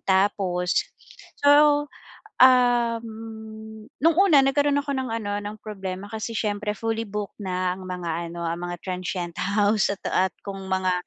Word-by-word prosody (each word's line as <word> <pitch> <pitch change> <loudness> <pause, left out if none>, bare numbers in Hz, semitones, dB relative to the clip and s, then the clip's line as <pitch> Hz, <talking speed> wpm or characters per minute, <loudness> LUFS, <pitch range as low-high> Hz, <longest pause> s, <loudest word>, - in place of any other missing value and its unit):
Tapos, 190 -2 +2 0.7
so, 290 0 +6 0.6
um, 240 -2 +4 0.9
no'ng 330 +1 +4
una 370 -8 +6
nagkaroon 285 +1 +2
ako 280 0 -3
ng 260 -1 -2
ano 205 -2 -2
ng 210 +1 -6
problema 195 -2 -6
kasi 220 +1 -4
siyempre 210 -1 -1
fully 225 +1 -2
booked 210 +1 -5
na 185 -2 -1
ang 190 - -10
mga 170 -2 -3
ano 170 0 -6
ang 170 +1 -2
mga 175 - -4
transient 180 -1 -3 0.2
house 210 0 +3
at 195 - -7
at 190 0 +2
kung 195 -1 -6
mga 185 -1 +1
205 Hz, 145 wpm, -24 LUFS, 185-240 Hz, 0.9 s, so